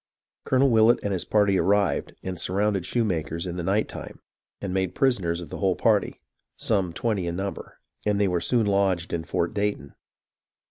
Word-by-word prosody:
Colonel 135 0 +3
VVillett 110 +1 +5
and 100 - -1
his 90 - -2
party 100 -3 +3
arrived, 100 +3 +1
and 90 -2 -4
surrounded 100 -1 0
Shoemaker's 85 -8 -1
in 90 -1 -4
the - - -2
night 100 +5 +1
time, - - -9 0.4
and 95 -2 -4
made 95 -1 -1
prisoners 95 -11 +1
of 85 - -9
the - - -7
whole 95 -2 +2
party, 110 -3 +1 0.4
some 95 -5 0
twenty 100 0 -1
in 85 - -2
number, 95 +2 -5 0.3
and 105 -1 +1
they 100 - +3
were 90 -2 0
soon 120 +2 +2
lodged 100 -3 +1
in 85 -1 -1
Fort 85 +1 -1
Dayton. 100 -9 -2
100 Hz, 180 wpm, -25 LUFS, 90-105 Hz, 0.4 s, VVillett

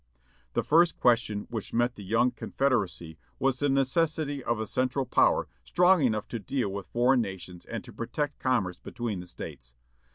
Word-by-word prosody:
"The - - +1
first 165 +2 +4
question 115 -4 +2
which 110 -4 -5
met 120 +1 +2
the 105 - -10
young 115 +6 +2
confederacy 100 - -1 0.2
was 135 -1 +1
the 145 - +1
necessity 145 +1 +1
of 120 -2 0
a 110 - -2
central 130 +3 0
power 125 - +3 0.2
strong 180 -1 +4
enough 110 -5 +1
to 115 - -4
deal 120 +2 -2
with 100 -1 -6
foreign 125 +1 +3
nations 90 -4 -7
and - - -5
to - - -12
protect 140 +5 -3
commerce 120 -9 0
between 115 -5 -4
the 90 - -8
States. - - -9
120 Hz, 170 wpm, -28 LUFS, 105-135 Hz, 0.2 s, first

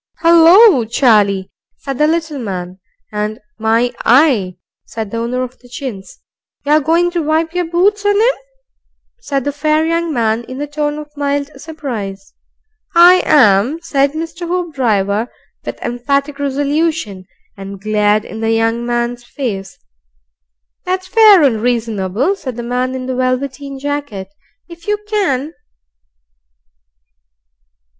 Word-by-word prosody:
"'Ullo, 335 - +7
Charlie!" 210 -5 +2 0.3
said 275 -2 -6
the 300 - +4
little 315 -3 -1
man, 185 -4 -5 0.3
and 210 +1 -3 0.2
"My 225 +2 +1
eye!" 235 - +3 0.3
said 220 -3 -6
the 230 - -3
owner 240 +2 -2
of 255 0 -8
the 245 - -19
chins. 240 -7 -8 0.4
"You're 300 +2 +4
going 335 +4 +1
to 345 -1 -1
wipe 320 +2 0
your 355 0 -1
boots 400 +5 +2
on 410 0 +2
'im?" 470 +4 +3 0.8
said 275 - -2
the 285 - -1
fair 305 +2 +1
young 335 0 0
man, 230 -3 0
in 255 +1 -8
a 290 - -2
tone 295 0 -3
of 300 0 -10
mild 285 0 -2
surprise. 225 -12 -6 0.6
"I 355 +2 +7
am," 250 0 +4
said 280 -3 +1
Mr. 330 +2 -5
Hoopdriver, 245 - -1 0.3
with - - -6
emphatic 280 +4 -1
resolution, 285 - -1 0.3
and 195 0 -9
glared 210 +1 +1
in 220 - -8
the 225 0 -1
young 225 +1 +1
man's 240 0 -2
face. 210 -8 -5 1.1
"That's 370 0 -2
fair 425 -6 +6
and 230 -6 +2
reasonable," 230 - 0
said 260 - -7
the 240 - -5
man 250 +2 -2
in 255 -1 -5
the 260 - -3
velveteen 265 +2 -2
jacket; 285 -9 -4 0.4
"if 340 +1 -14
you 420 0 +1
can." 325 -9 -1
275 Hz, 135 wpm, -16 LUFS, 225-320 Hz, 1.1 s, Ullo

